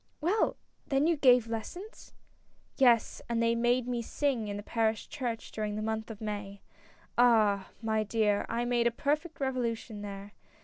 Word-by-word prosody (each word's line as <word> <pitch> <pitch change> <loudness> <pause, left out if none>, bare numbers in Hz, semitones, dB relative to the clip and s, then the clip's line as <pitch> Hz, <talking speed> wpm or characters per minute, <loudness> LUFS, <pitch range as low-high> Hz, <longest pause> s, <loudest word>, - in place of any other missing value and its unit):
" - - -43
Well! 370 +8 +1 0.3
then 275 0 +2
you 335 0 +3
gave 250 -5 +5
lessons! 350 - -7 0.3
" - - -42 0.3
"Yes, 240 -4 +3
and 235 -1 0
they 230 0 +3
made 240 +1 +1
me 245 -1 -1
sing 245 -2 -1
in 205 0 -4
the 205 - -6
parish 220 -1 0
church 240 -5 -4
during 210 -1 -3
the 215 - -3
month 220 0 -2
of 220 -2 -8
May. 205 -2 -5 0.6
Ah! 215 -5 +4
my 220 -1 +1
dear, 210 -1 +1
I 235 +1 -1
made 240 -1 +2
a - - +5
perfect 300 +7 -2
revolution 235 -5 -2
there. 200 0 -8
230 Hz, 175 wpm, -30 LUFS, 215-255 Hz, 0.6 s, gave